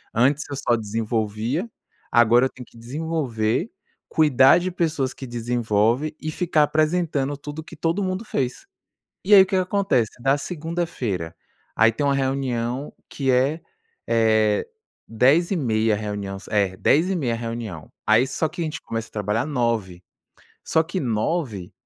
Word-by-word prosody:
Antes 135 +5 +2
eu 140 - -4
só 120 -2 +1
desenvolvia, 110 - -2 0.4
agora 120 +2 +5
eu - - -13
tenho 125 -1 -12
que 115 - -20
desenvolver, 135 - -2 0.4
cuidar 145 -1 +5
de 185 +1 -3
pessoas 155 -7 -1
que 130 - -9
desenvolvem 120 +4 0
e 155 - -3
ficar 160 -3 +2
apresentando 155 -2 0
tudo 145 +2 -8
o - - -6
que - - -11
todo 170 +5 -1
mundo 185 +3 -2
fez. 130 - -3 0.6
E 205 +2 +6
aí 190 - +10
o - - -3
que 190 - -2
que - - +4
acontece, 185 - +1
na 135 +2 +3
segunda-feira, 155 - -3 0.4
aí 115 +1 +5
tem 130 - -3
uma 140 -1 +2
reunião 130 -1 -2 0.2
que 135 -2 -2
é 135 +6 +2 0.5
é, 110 -2 +2 0.4
10:30h 125 - +2
reunião, 100 -2 -4
é 100 -3 +1
10:30h 160 -5 +2
a - - -5
reunião, 115 -8 -6 0.2
aí 115 +4 +4
só 155 +4 -1
que 170 +2 -7
a - - +1
gente 155 - -5
começa 115 -1 -4
a - - -40
trabalhar 105 +2 -1
9:00h, 115 - -1 0.6
só 160 - +2
que 175 +3 -4
nove 115 - -2
130 Hz, 155 wpm, -23 LUFS, 110-160 Hz, 0.6 s, aí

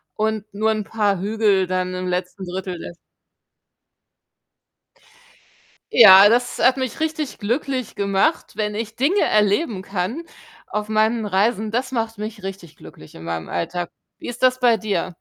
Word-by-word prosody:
und 215 -1 -1
nur 220 +2 +1
'n 215 -1 -2
paar 205 -3 0
Hügel 205 -3 +1
dann 185 0 -2
im 185 0 -4
letzten 180 +1 -3
1/3 185 0 -5
des 170 - -9 3.0
Ja, 200 -2 +9
das 245 +2 +1
hat 255 +1 +4
mich 260 +1 -4
richtig 310 -3 -3
glücklich 255 +2 -3
gemacht, 200 +11 0
wenn 210 -1 -2
ich 225 0 -5
Dinge 305 - +1
erleben 210 - +1
kann 195 - -3 0.5
auf 210 0 -3
meinen 220 +1 +1
Reisen. 210 +2 0
Das 255 +3 -1
macht 225 -3 -2
mich 210 -1 -7
richtig 185 -5 -8
glücklich 80 - -14
in 80 - -11
meinem 85 -1 -4
Alltag. 175 +1 -3 0.3
Wie - - -8
ist 245 +1 -3
das 255 0 +3
bei 240 -2 +4
dir? 190 -4 -3
210 Hz, 150 wpm, -21 LUFS, 190-230 Hz, 3.0 s, Ja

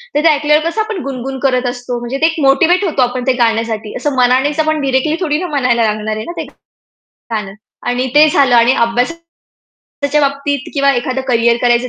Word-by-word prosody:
तर - - +3
ते 330 - +6
ऐकल्यावर 300 +2 +2
कसं 435 +5 -2
आपण 430 -5 -4
गुणगुण 265 0 -5
करत 255 -1 0
असतो. 245 -1 -5
म्हणजे 240 +3 -4
ते - - +5
एक 325 -1 -3
मोटिव्हेट 350 +7 +3
होतो 300 -6 0
आपण 245 0 -2
ते 260 - +4
गाण्यासाठी 225 -1 -2
असं 290 -2 -2
मनानेच 260 +5 +2
आपण 310 -1 +1
डायरेक्टली 270 +3 0
थोडी 300 -3 0
ना, 365 - -3
म्हणायला 250 -6 +1
लागणार 215 0 -1
आहे 215 - -5
ना, 345 - -6
ते - - -4 0.6
गाणं 210 -4 -7 0.4
आणि 250 +1 -1
ते 305 +1 +7
झालं 270 -4 +3
आणि 235 +2 +5
अभ्यासाच्या 250 +9 -2 0.8
बाबतीत 280 0 -2
किंवा 280 0 +3
एखादं 255 +2 -2
करियर 235 -1 +3
करायचं 240 +1 +2
260 Hz, 190 wpm, -15 LUFS, 240-300 Hz, 0.8 s, ते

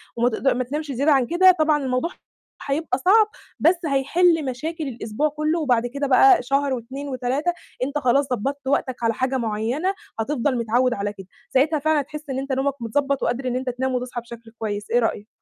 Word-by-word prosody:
وما 240 +1 +2
تقد 260 +4 -3
ما 255 -1 +2
تنامش 295 +3 -4
زيادة 280 +5 +2
عن 265 -3 +4
كده، 370 +4 +6
طبعًا 305 -2 +2
الموضوع 255 +6 -1 0.6
هيبقى 275 -2 -1
صعب، 415 +9 +5 0.3
بس 335 +4 +5
هيحل 315 +3 +2
مشاكل 310 +6 -4
الأسبوع 240 +4 -2
كلّه 305 +3 -1
وبعد 245 -6 +1
كده 280 +3 -3
بقى 370 +7 +6
شهر 275 +1 +1
و2 265 +4 -6
و3 260 +6 -1 0.3
أنت 285 +3 -2
خلاص 275 0 +2
ضبّطت 275 +4 -3
وقتك 260 -3 -1
على 230 0 +2
حاجة 260 +3 -1
معيّنة 235 - -1 0.3
هتفضل 255 +1 0
متعوّد 240 +2 +1
على 205 -1 -3
كده، 190 -2 -12 0.3
ساعتها 295 +3 +3
فعلًا 310 0 +2
هتحس 300 +1 -9
إن 265 0 -2
أنت 275 0 -5
نومك 270 +1 0
متضبّط 275 +4 -1
وقادر 255 +2 -1
إن 250 - -1
أنت 255 0 -2
تنام 260 +1 -2
وتصحى 245 -1 -3
بشكل 235 -1 -12
كويس، 210 -1 -4
إيه 240 - +4
رأيك؟ 220 -2 -1
265 Hz, 190 wpm, -23 LUFS, 245-295 Hz, 0.6 s, كده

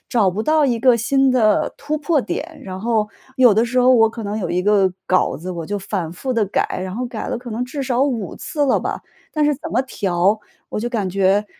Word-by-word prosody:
找 210 -6 +3
不 205 +4 -3
到 310 +1 +3
一 240 -3 0
个 250 -1 +5
新 270 +4 +2
的 225 -5 +2
突 300 +2 -2
破 300 0 +1
点， 310 +4 -5
然 185 -5 -6
后 220 0 0 0.3
有 245 -5 +6
的 225 +3 +3
时 250 +2 -1
候 250 +1 +5
我 225 -3 +6
可 230 - -7
能 205 +1 -3
有 195 - -3
一 180 +1 0
个 195 -2 +3
稿 185 - +2
子， 180 +4 -6
我 170 -3 -5
就 205 +4 -3
反 185 -4 -4
复 260 +9 -5
地 230 -3 +2
改。 190 - -1
然 185 0 -5
后 250 +3 -2
改 235 -3 -5
了 - - -2
可 245 0 -9
能 230 +3 -2
至 275 +3 -5
少 255 -1 +1
5 235 -9 -2
次 295 -3 -1
了 265 - +3
吧， - - -3 0.3
但 305 - 0
是 295 0 +3
怎 - - -8
么 - - +2
调， 195 -5 0 0.3
我 - - -4
就 240 +3 -3
感 215 -6 -1
觉 195 +2 +2
225 Hz, 260 characters per minute, -20 LUFS, 195-260 Hz, 0.3 s, 有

